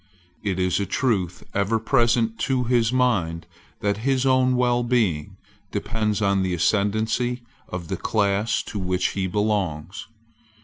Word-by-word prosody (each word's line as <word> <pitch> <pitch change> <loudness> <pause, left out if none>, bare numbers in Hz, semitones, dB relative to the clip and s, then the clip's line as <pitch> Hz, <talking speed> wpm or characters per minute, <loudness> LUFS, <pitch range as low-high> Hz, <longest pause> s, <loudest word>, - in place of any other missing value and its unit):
It 95 -3 -2
is 90 0 +1
a 100 - -2
truth 95 -9 -1
ever 100 +3 +1
present 115 -1 +1
to 130 -2 +2
his 120 -2 +2
mind 95 -11 +1 0.4
that 100 -1 0
his 130 +3 0
own 130 -1 +3
wellbeing 120 -9 +1 0.3
depends 110 -1 -1
on 100 -1 +2
the 95 -1 0
ascendency 110 +6 0 0.2
of 90 -2 -6
the - - -3
class 105 +1 0
to 105 - -6
which 90 -1 0
he 95 -1 -2
belongs. 95 -4 -2
105 Hz, 135 wpm, -24 LUFS, 95-120 Hz, 0.4 s, own